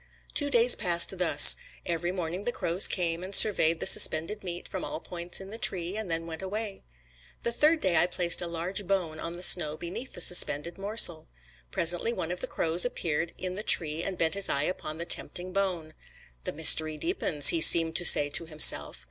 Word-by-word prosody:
Two 290 -1 -1
days 240 -2 +3
passed 175 -2 0
thus: 180 - +6 0.3
every 175 0 -5
morning 180 +1 -7
the 240 - -3
crows 175 -3 0
came 170 -2 -4
and 190 +1 -4
surveyed 165 -6 +3
the - - -6
suspended 165 +7 +2
meat 175 -1 -8
from 190 - -8
all - - -7
points 175 +1 -7
in 195 +1 -12
the 225 - -11
tree, 180 -3 -1
and 215 -3 -7
then 165 0 -5
went 160 0 -11
away. 200 +1 -8 0.6
The 235 - -3
third 310 +6 -1
day 185 -2 -2
I 175 - +2
placed 175 -1 -1
a 175 - -6
large 175 +4 -6
bone 175 -5 -4
on 165 +1 -8
the 175 +1 -6
snow 155 -4 +4
beneath 175 +11 -10
the - - -9
suspended 170 0 +1
morsel. 195 -6 0 0.4
Presently 175 - -1
one 170 -7 -7
of 180 - -6
the - - -6
crows 165 +2 0
appeared 170 -8 -4
in 185 -1 -7
the 200 - -8
tree, 160 -6 +1
and 185 +1 -8
bent 160 -1 -2
his 200 0 -1
eye 140 - -2
upon 155 -2 -7
the 170 - -8
tempting 180 +1 -3
bone. 180 -5 -5 0.5
"The - - -5
mystery 155 0 +5
deepens," 160 - +3
he 165 - 0
seemed 165 0 +6
to - - -1
say 145 -4 +5
to 165 +3 0
himself. 150 - +2
175 Hz, 205 wpm, -25 LUFS, 165-195 Hz, 0.6 s, thus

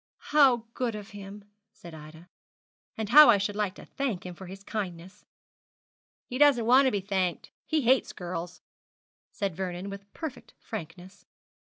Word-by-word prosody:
'How 265 -6 +5
good 240 -4 -2
of 210 0 -9
him!' 205 0 -10 0.3
said 170 -1 -13
Ida; 160 +2 -12 0.7
'and 220 -2 -3
how 300 +3 +9
I 220 - +7
should 200 +1 -2
like 205 -2 -1
to - - -12
thank 235 -11 -3
him 180 - -6
for 185 +1 -11
his 195 +2 -10
kindness!' 190 -2 -6 1.0
'He 255 - -6
doesn't 280 -6 +5
want 260 +3 +6
to - - +2
be 205 - -1
thanked. 185 -3 -2 0.2
He 315 -1 +1
hates 260 +1 +3
girls,' 175 0 -6 0.7
said 195 -5 -3
Vernon, 185 +1 -4
with 200 0 -10
perfect 320 -5 -8
frankness. 180 -2 -9
200 Hz, 160 wpm, -28 LUFS, 180-235 Hz, 1.0 s, how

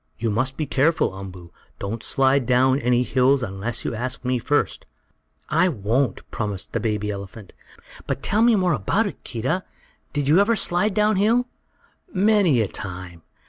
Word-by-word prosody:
You 115 -1 -1
must 130 +5 -1
be 155 - -1
careful, 145 - +1
Umboo. 90 -3 -9 0.3
Don't 110 +3 -4
slide 135 -1 +2
down 130 +2 +3
any 125 0 +2
hills 130 +1 +2
unless 105 +3 -3
you - - -2
ask 125 +3 -4
me 125 0 +1
first." 145 +5 -1 0.6
"I 165 +4 +3
won't," 115 - -1
promised 105 -4 -4
the - - 0
baby 105 -2 -1
elephant. 100 0 -9 0.5
"But 135 - -3
tell 210 - +1
me 235 -1 +5
more 185 -4 +2
about 155 - +1
it, 200 - -6
Keedah. 130 +10 -2 0.5
Did 145 -2 -2
you 155 +6 +5
ever 215 +3 +3
slide 190 +1 0
down 210 -1 +3
hill?" 230 +5 +3 0.7
"Many 195 - +3
a 105 - 0
time. 90 -2 -7
130 Hz, 165 wpm, -23 LUFS, 105-175 Hz, 0.7 s, me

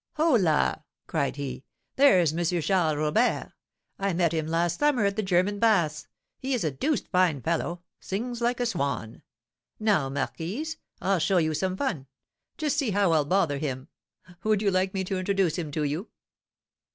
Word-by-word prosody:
"Holla!" 205 - +2 0.2
cried 140 - -1
he, 140 -2 -5 0.3
"there's 185 - +5
M. 170 +2 -1 0.2
Charles 170 -5 +2
Robert. 155 +11 +1 0.5
I 195 -1 0
met 170 -1 +2
him 160 -1 -1
last 170 +1 0
summer 285 -7 +3
at 200 0 +1
the 215 - 0
German 190 +1 +1
baths; 170 -10 +2 0.3
he 265 0 -1
is 240 - -2
a 155 - 0
deuced 250 - -1
fine 180 -6 +2
fellow, 170 +4 -2 0.2
sings 235 +5 -4
like 240 +1 +1
a 245 - +1
swan. 140 - -2 0.6
Now, 205 -11 +2
marquise, 180 - -3 0.3
I'll 195 -1 +2
show 185 +4 +2
you 160 -2 +2
some 185 +4 -1
fun, 175 - -2 0.5
just 305 -4 -1
see 270 -6 +1
how 200 -3 +2
I'll 155 -3 +3
bother 155 -4 +1
him. 135 -1 -4 0.5
Would 215 -1 +2
you 200 - +3
like 185 +1 0
me 190 - 0
to 190 0 -2
introduce 190 -3 +1
him 160 -3 -4
to 155 - -1
you?" 150 +8 -3
185 Hz, 170 wpm, -27 LUFS, 155-210 Hz, 0.6 s, there's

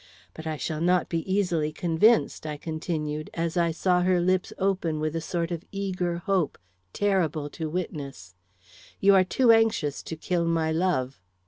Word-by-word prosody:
But 160 0 -8
I 155 -1 -2
shall 155 +1 -3
not 180 +1 +2
be 165 +2 -2
easily 175 -6 +1
convinced," 170 +3 +2
I 150 -1 -4
continued, 155 -1 -4
as 165 0 -2
I 170 -1 +2
saw 180 +2 +1
her 180 0 +3
lips 185 +1 +1
open 185 -5 0
with 155 +1 -2
a 165 - -1
sort 170 +1 -2
of 170 0 -4
eager 185 -3 -2
hope 180 -3 0 0.3
terrible 165 - 0
to 160 -2 -4
witness. 140 - -5 0.7
"You 200 0 +5
are 190 -1 +6
too 235 +6 +3
anxious 225 -10 +2
to 160 - -6
kill 170 +2 -1
my 165 -1 +1
love." 160 - 0
170 Hz, 165 wpm, -26 LUFS, 155-185 Hz, 0.7 s, are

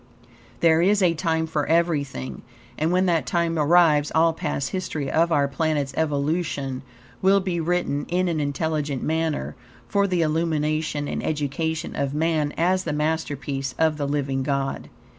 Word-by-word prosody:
There 165 -1 +5
is 200 +2 +3
a 175 -2 +4
time 160 -1 0
for 155 -2 -2
everything, 155 -6 0 0.3
and 155 +5 0
when 185 +1 +3
that 165 -7 +1
time 165 +1 0
arrives 150 -1 +4
all 165 +1 +4
past 140 -4 -3
history 160 -7 -3
of 165 +2 +2
our 140 -3 +3
planet's 145 -1 -1
evolution 145 -3 -1 0.4
will 195 +1 +5
be 185 -3 -2
written 165 -4 -1
in 180 +1 +1
an 165 -3 0
intelligent 145 -1 -2
manner 160 -1 -1 0.3
for 200 -1 +2
the 180 -3 +1
illumination 155 -2 0
and - - -3
education 155 +2 -2
of 140 0 -2
man 155 -2 +1
as 185 +3 +2
the - - -2
masterpiece 145 -4 -2
of 160 -1 +2
the 145 -1 -2
Living 140 -2 -1
God. 135 0 -2
160 Hz, 155 wpm, -24 LUFS, 145-170 Hz, 0.4 s, There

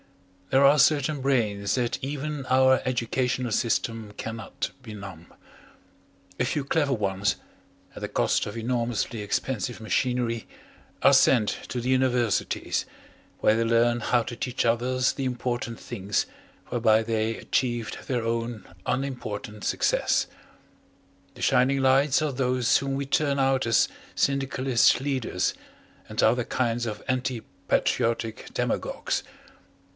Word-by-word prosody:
There 135 +1 +5
are 145 +2 +6
certain 145 0 +3
brains 105 -7 +1
that 120 -1 -1
even 145 0 -3
our 130 0 +4
educational 125 0 -1
system 115 -1 -1
cannot 110 0 -5
benumb. 100 -7 -9 1.1
A - - +3
few 145 - -1
clever 145 -1 +1
ones, 100 -4 0 0.6
at - - -9
the - - -3
cost - - +1
of 105 - -6
enormously 115 -1 -1
expensive 110 +2 -2
machinery, 115 0 -1 0.6
are - - +7
sent 110 -5 +5 0.2
to 125 - -2
the 120 - -4
universities, 125 -4 +1 0.6
where 110 - +4
they 115 - +1
learn 115 +1 +3
how 120 +1 +2
to 120 - -6
teach 125 +1 -2
others 125 +2 +1
the 135 - -4
important 125 -2 -3
things 100 -5 -2 0.4
whereby 115 -2 +3
they 110 0 -1
achieved 120 -3 -1
their 125 -3 -1
own 115 -2 -2 0.2
unimportant 110 -6 -3
success. - - +1 1.1
The - - -7
shining 135 +2 +3
lights 135 +2 +4
are 150 - 0
those 125 0 +2
whom 135 0 -2
we 140 0 -2
turn 140 0 +1
out 135 -1 +2
as 115 - +4 0.3
syndicalist 135 -3 +2
leaders 130 -9 -1 0.6
and - - -1
other 125 0 +3
kinds 120 -1 -1
of 105 - -5
anti 130 -2 -1 0.3
patriotic 115 -1 0
demagogues. - - -1
120 Hz, 125 wpm, -26 LUFS, 115-130 Hz, 1.1 s, are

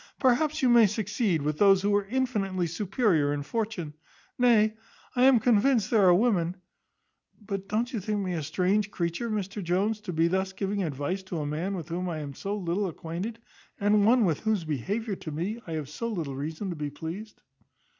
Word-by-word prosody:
Perhaps 290 +4 +2
you 255 - +5
may 235 -2 +7
succeed 205 - -1
with 150 +1 -2
those 195 -2 +5
who 205 0 +2
are 205 -1 +1
infinitely 210 -7 -1
superior 175 - +1
in 145 0 -2
fortune; 205 -5 -3 0.4
nay, 225 -3 +4 0.4
I 250 +1 +4
am 265 -3 +6
convinced 230 0 +3
there 210 -5 +5
are 180 - +7
women 180 -5 +2 0.8
but 195 -2 -5
don't 235 +5 -1
you 230 - -1
think 210 +2 -2
me 185 -2 -2
a 165 - -2
strange 185 +7 +1
creature, 170 +6 -2
Mr 205 -1 -3
Jones, 195 +5 0
to 210 - -5
be 165 0 +2
thus 190 +2 -1
giving 195 +1 -2
advice 155 +3 -2
to 185 -2 -6
a 150 - -2
man 165 +7 -2
with 170 -2 -6
whom 180 +2 -2
I 165 - -3
am 145 -2 -6
so 200 +8 -4
little 190 +1 -1
acquainted, 180 +6 -5 0.4
and 205 0 +3
one 230 +1 +5
with 160 -5 +1
whose 215 -5 0
behaviour 195 - -2
to 155 - -7
me 190 +10 -3
I 165 - -4
have 155 -3 -3
so 190 +11 -4
little 165 -11 -3
reason 160 +7 -4
to - - -4
be 150 -1 -3
pleased?" 170 +9 -7
195 Hz, 195 wpm, -28 LUFS, 170-215 Hz, 0.8 s, may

